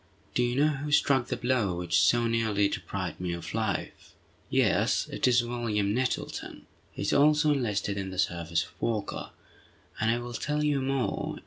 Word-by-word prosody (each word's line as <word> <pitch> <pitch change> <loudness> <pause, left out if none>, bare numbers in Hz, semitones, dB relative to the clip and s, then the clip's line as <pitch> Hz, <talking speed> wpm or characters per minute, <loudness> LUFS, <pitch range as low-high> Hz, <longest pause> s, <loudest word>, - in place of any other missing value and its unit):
Do - - +1
you 120 0 +1
know 145 +1 +2
who 150 +2 -5
struck 135 -4 +3
the - - -2
blow 120 -7 0
which 90 -1 +2
so 120 -1 +4
nearly 110 -3 +2
deprived - - -4
me 90 -1 -2
of 85 - -6
life?" 110 -4 -3 0.3
"Yes; - - +2
it - - +1
was 120 -1 +4
William 115 -4 -1
Nettleton! 130 +2 -3 0.3
He - - -6
is 100 - 0
also 150 +1 +4
enlisted 105 -7 -1
in 95 -1 -4
the 95 - -7
service 85 -3 0
of - - -15
Walker. 110 -3 -2 0.7
And 110 - +1
I 115 - +2
will 120 0 -6
tell 150 +5 -1
you 145 -2 +1
more. 135 -1 -2
120 Hz, 180 wpm, -28 LUFS, 100-135 Hz, 0.7 s, so